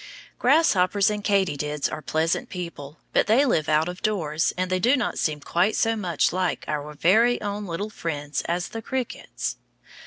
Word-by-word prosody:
Grasshoppers 205 - +3
and 210 -1 -4
katydids 150 -8 0
are 155 - -6
pleasant 160 +2 -1
people, 170 -5 -7 0.2
but - - +3
they 240 +7 +4
live 155 - +1
out 155 +1 +3
of 180 +1 -6
doors, 160 -8 0
and 185 0 -1
they 185 - +1
do 245 +9 +4
not 240 - -2
seem 150 -2 0
quite 175 +8 +1
so 225 0 +2
much 175 -7 0
like 185 -1 -1
our 150 0 -4
very 220 +11 +4
own 205 0 -4
little 200 +5 -4
friends 150 -6 -3
as 175 +2 -1
the 225 - -6
crickets. 255 +1 -4
180 Hz, 175 wpm, -25 LUFS, 155-210 Hz, 0.2 s, they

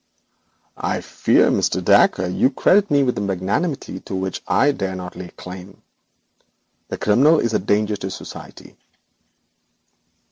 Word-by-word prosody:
'I - - -2
fear, - - +2
Mr. - - 0
Dacre, 95 - +4
you 90 +8 +2
credit 195 +8 +3
me 140 -1 +3
with 125 -4 -1
a - - -2
magnanimity 100 - -2
to 95 - -7
which 95 0 -3
I 130 +9 +3
dare 95 -8 -4
not 90 -1 -7
lay 90 -1 -8
claim. 90 +2 -11 1.0
The - - -5
criminal 140 +10 +4
is 115 -1 -1
a - - +2
danger 105 +2 0
to 95 - -5
society.' 95 - -10
100 Hz, 140 wpm, -20 LUFS, 95-135 Hz, 1.0 s, Dacre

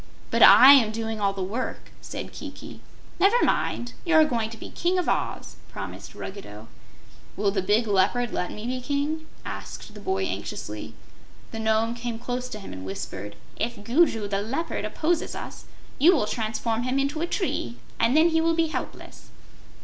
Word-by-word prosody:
"But - - +1
I 270 +2 +10
am 235 -6 +5
doing 225 -1 -4
all 200 -1 +3
the 195 -1 -4
work," 225 +7 -4
said - - -7
Kiki. - - -9 0.4
"Never 430 +5 +4
mind; 240 0 0
you're 320 -3 +5
going 230 -6 -1
to 225 - -9
be - - -9
King 355 +2 0
of 360 - 0
Oz," - - -2
promised - - -8
Ruggedo. 110 - -8 0.7
"Will 200 -1 +1
the 195 -1 0
big 210 +5 +2
Leopard 215 +4 +1
let 180 - -2
me 210 - -7
be 255 +1 -2
King?" 295 +4 -2 0.2
asked - - -7
the - - -10
boy 380 0 -1
anxiously. - - -5 0.6
The 225 - -5
Nome 220 +1 +1
came 235 -1 -4
close 250 +1 -4
to 215 -4 -6
him 195 - -9
and 95 0 -8
whispered: 100 +1 -6 0.2
"If 230 -2 -3
Gugu 235 -3 +2
the 200 0 -1
Leopard 270 +11 -3
opposes 330 +1 -1
us, - - -8 0.3
you 330 +7 +7
will 260 - +1
transform 225 +1 -2
him 255 +2 -1
into 280 +3 0
a 340 - 0
tree, 120 - -2 0.2
and 245 +6 +3
then 325 +2 +6
he 325 0 +2
will 330 0 +2
be 325 -1 +1
helpless." - - -7
235 Hz, 180 wpm, -25 LUFS, 210-310 Hz, 0.7 s, I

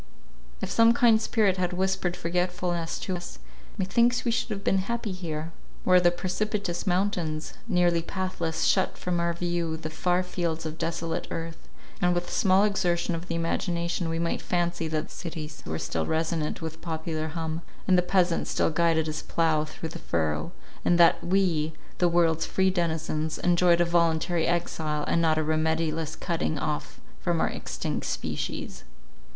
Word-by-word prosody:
If - - -3
some 230 0 +6
kind 235 -4 +5
spirit 210 -5 +2
had 180 -1 0
whispered 190 -1 0
forgetfulness 175 -1 -1
to 185 - -2
us, 175 0 -7 0.4
methinks 235 +6 +2
we 235 - +2
should 235 - -1
have 200 -2 -4
been 195 - +3
happy 230 +2 -2
here, 165 -3 -4 0.3
where 185 0 +6
the 175 - +6
precipitous 190 +1 -2
mountains, 175 -4 0
nearly 175 -4 +3
pathless, 170 -2 -2
shut 190 - +2
from 180 -1 -1
our 170 0 +1
view 170 -1 -1
the 155 -1 -6
far 180 +3 +1
fields 170 -3 -2
of 155 +1 -5
desolate 165 0 -2
earth, 165 0 -6 0.3
and 180 0 +3
with 175 0 -2
small 190 0 +4
exertion 180 -4 +1
of 165 +2 -5
the 165 - -2
imagination, 170 0 -1
we 165 - -1
might 170 0 -1
fancy 175 -2 -1
that 155 0 -2
the - - -11
cities 160 -3 -6
were 80 0 -2
still 80 0 -2
resonant 160 0 -1
with 160 0 -6
popular 160 -1 -3
hum, 160 0 -3 0.3
and 185 - +5
the 180 - +5
peasant 180 -1 +2
still - - +1
guided 165 0 +2
his 155 0 -3
plough 160 -2 +1
through 160 +1 -7
the - - -8
furrow, 80 -2 -1 0.3
and 175 - +3
that 170 -1 +6
we, 175 -4 +1 0.3
the 175 - +4
world's 165 -2 +2
free 190 0 +2
denizens, 160 -3 -1
enjoyed 175 -1 +4
a 175 - +4
voluntary 170 0 +2
exile, 160 -3 -1
and 170 - +2
not 160 -1 +3
a 155 - +2
remediless 160 0 0
cutting 165 -2 -1
off 150 +1 -3 0.2
from 175 -2 0
our - - +2
extinct - - -3
species. - - -4
170 Hz, 170 wpm, -27 LUFS, 160-180 Hz, 0.4 s, some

